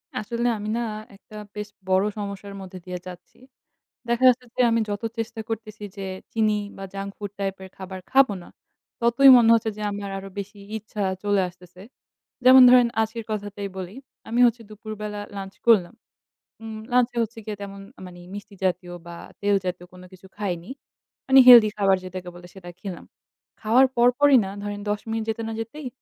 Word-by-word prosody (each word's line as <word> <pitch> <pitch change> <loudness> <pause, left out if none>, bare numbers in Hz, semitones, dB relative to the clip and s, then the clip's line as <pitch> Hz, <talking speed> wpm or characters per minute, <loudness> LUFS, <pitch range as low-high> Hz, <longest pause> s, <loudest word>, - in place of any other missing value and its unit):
আসলে 235 +3 -2
আমি 210 +1 -5
না - - -1 0.3
একটা 210 +2 -16 0.2
বেশ 210 0 -5 0.2
বড় 190 +1 +4
সমস্যার 200 -1 -6
মধ্যে 185 0 -9
দিয়ে 180 -1 -5
যাচ্ছি। 180 -1 -12 0.7
দেখা 235 +2 0
যাচ্ছে 250 0 0
যে - - +2
আমি 230 0 +2
যত 205 +2 -4 0.2
চেষ্টা 225 0 -4
করতেছি 215 -2 -6
যে 195 - -5 0.3
চিনি 215 -2 +2 0.2
বা 195 - -7
junk 200 0 -5
food 205 -2 -6
type 195 -1 -2
এর 190 - -10
খাবার 190 0 -7
খাবো 265 -5 +5
না, - - -15 0.5
ততই 240 +4 +6
মনে 230 -2 +5
হচ্ছে 225 -1 -1
যে - - -7
আমার 200 0 -5
আরও 195 0 -8
বেশি 200 +1 -8 0.2
ইচ্ছা 210 -1 -5 0.2
চলে 205 -1 +2
আসতেছে। 180 0 -17 0.6
যেমন 260 +1 +9
ধরেন 250 -1 +7
আজকের 220 +1 -3
কথাটাই 205 -1 -4
বলি। 190 +2 -6 0.3
আমি 235 +2 0
হচ্ছে 235 0 -2
দুপুরবেলা 210 -1 -7 0.2
lunch 195 0 -8
করলাম। 205 -4 +4 0.7
উম 220 -1 -7 0.2
lunch 250 0 +3
এ - - -6
হচ্ছে 225 +1 -7
গিয়ে 210 -2 -5
তেমন 200 0 -8 0.3
মানে 175 -1 -12 0.2
মিষ্টি 205 0 -10
জাতীয় 180 -1 -2
বা 170 - -8 0.3
তেল 205 0 +2
জাতীয় 180 -1 -4
কোন 180 - -13
কিছু 185 +1 -15
খাইনি। 180 -3 -4 0.6
মানে 265 0 +7
healthy 235 -4 +10
খাবার 195 -2 +3
যেটাকে 185 0 -7
বলে 175 0 -12
সেটা 180 -2 -10
খেলাম। 190 -4 -7 0.6
খাওয়ার 245 +5 +5
পরপরই 250 +4 +5
না - - -5
ধরেন 205 0 -4
১০ 205 0 0
মিনিট 225 0 -2
যেতে 220 +1 -2
না - - -4
যেতেই 255 +5 -7
205 Hz, 180 wpm, -24 LUFS, 195-230 Hz, 0.7 s, healthy